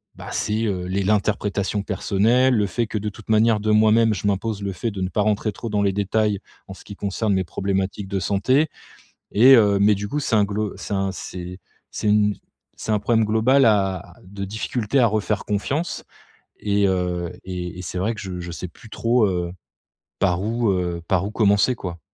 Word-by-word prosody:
bah, - - -9
c'est, 110 +2 -1
heu, 95 -4 -2
les 95 +2 -1
l'interprétation 105 0 0
personnelle. 110 +6 +2
Le 105 -2 +2
fait 120 +4 -1
que 110 - -3
de 105 +1 -3
toute 105 +1 -14
manière, 110 0 +4
de 110 +1 0
moi-même, 110 +1 +4
je 100 0 -3
m'impose 100 +1 -1
le 100 - -2
fait 110 +6 -3
de 100 -2 -6
ne 95 - -1
pas 105 - 0
rentrer 105 +1 0
trop 115 +4 -6
dans 105 -1 0
les 100 - +2
détails, 105 +1 0 0.3
en 95 - -8
ce - - -15
qui 100 - -9
concerne 100 +2 -1
mes 95 -1 +1
problématiques 95 +2 -2
de 100 -1 -1
santé. 115 - +2 0.6
Et 130 +6 +7
heu 100 -4 +4
mais 105 +1 +5
du 100 +1 -4
coup 150 - -1
c'est 120 - 0
un 105 - +5
glo 105 +1 -3
c'est - - -5
un 95 -1 0
c'est 90 0 -7 0.3
c'est - - -3
une 105 0 +3 0.4
c'est - - -4
un 105 - +2
problème 110 +1 +2
global 115 +6 +3
à 95 -5 +1
de 100 +1 -7
difficultés 110 +4 -1
à 120 - +5
refaire 105 -1 -1
confiance. 135 - -2 0.6
Et 100 -1 +1
heu, 90 -2 -1
et 90 -1 -5
et - - -4
c'est 90 - -5
vrai 110 +5 -1
que - - -8
je 95 -2 -6
je 85 0 -6
sais 90 +2 -6
plus 110 - -16
trop, 115 +1 +2
heu, 90 -2 -2 0.7
par 90 -2 +1
où, 115 +1 0
heu, 90 -2 -2
par 95 -1 +2
où - - -3
commencer 105 +3 +3
quoi. 90 -6 -6
105 Hz, 210 wpm, -22 LUFS, 95-110 Hz, 0.7 s, Et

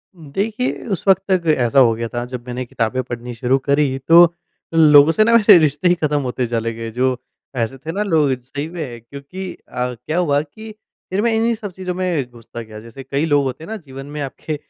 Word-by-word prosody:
उम, 155 -5 -14
देखिए 215 - -2
उस 190 - -4
वक़्त 190 0 +5
तक 175 -3 +1
ऐसा 120 +2 +2
हो 120 -3 +5
गया 115 0 -4
था 120 0 -2
जब 125 -1 -8
मैंने 125 +1 -4
किताबें 120 +1 -2
पढ़नी 120 0 -7
शुरू 125 +3 +1
करी 140 -2 +2
तो, 170 +4 +6 0.4
लोगों 150 -1 +7
से 215 - +3
ना 230 +1 +3
मेरे 210 -4 +8
रिश्ते 155 +2 +2
ही 180 - +4
ख़त्म 150 -3 0
होते 125 -1 -2
चले 115 -1 -2
गए। 115 0 -6
जो 125 +3 0 0.5
ऐसे 115 +3 -2
थे 155 +5 -6
ना 200 +5 -1
लोग 160 -8 +2
सही 140 +4 -6
में 145 -9 -7
क्योंकि 140 +10 -8
अ, 125 0 -5
क्या 155 +8 -5
हुआ 145 -5 +2
कि 215 +9 -11 0.4
फिर 195 +2 0
मैं 235 - +2
इन्हीं 230 +1 +2
सब 210 -3 -7
चीज़ों 180 0 -5
में 175 -9 -1
घुसता 120 0 -10
गया। 110 -1 -10
जैसे 115 +4 -11
कई 140 +3 -1
लोग 145 -3 +2
होते 130 +3 -4
हैं - - -10
ना, 220 - -3
जीवन 135 -6 -10
में 150 - -4
आपके 140 +3 -5
145 Hz, 225 wpm, -19 LUFS, 125-175 Hz, 0.5 s, मेरे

